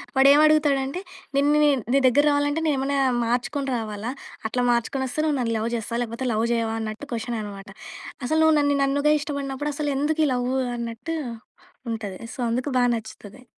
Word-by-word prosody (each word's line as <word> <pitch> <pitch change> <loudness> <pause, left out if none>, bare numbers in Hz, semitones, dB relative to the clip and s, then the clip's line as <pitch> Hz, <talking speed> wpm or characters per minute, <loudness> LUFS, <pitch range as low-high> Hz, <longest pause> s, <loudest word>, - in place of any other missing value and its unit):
వాడు 265 +1 +6
ఏమి 295 +1 +6
అడుగుతాడంటే. 295 0 +2 0.4
నిన్ను 290 +2 +4
నేను 280 -4 +3
నీ 275 - +5
దగ్గరకి 290 +4 +4
రావాలంటే 290 +2 +1
నేనేమన్నా 275 -1 0 0.3
మార్చుకొని 250 +4 -1
రావాలా? 220 +1 -4 0.4
అట్లా 250 +1 0
మార్చుకొని 240 +3 0
వస్తే 260 +5 -2
నువ్వు 300 -3 +1
నన్ను 230 -2 0
లవ్ 220 +1 -1
చేస్తావా? 235 +1 -3
లేకపోతే 235 +2 -4
లవ్ 220 +1 +1
చేయవా? 225 -1 -1
అన్నట్టు 220 +5 -5
క్వశ్చన్ 235 0 -3
అన్నమాట. 200 -1 -8 0.6
అసలు 315 +5 +1
నువ్వు 315 0 +5
నన్ను 285 -1 +2
నన్నుగా 285 +2 +2
ఇష్టపడినప్పుడు 285 -1 -3
అసలు 295 -1 -1
ఎందుకు 310 +3 0
ఈ - - 0
లవ్ 245 0 -1 0.3
అన్నట్టు 235 +7 -4 0.8
ఉంటది. 210 -4 -5 0.2
సో - - -16
అందుకు 250 +4 -1
బాగా 245 0 +3
నచ్చుతది. 220 +2 -11
265 Hz, 170 wpm, -24 LUFS, 230-290 Hz, 0.8 s, వాడు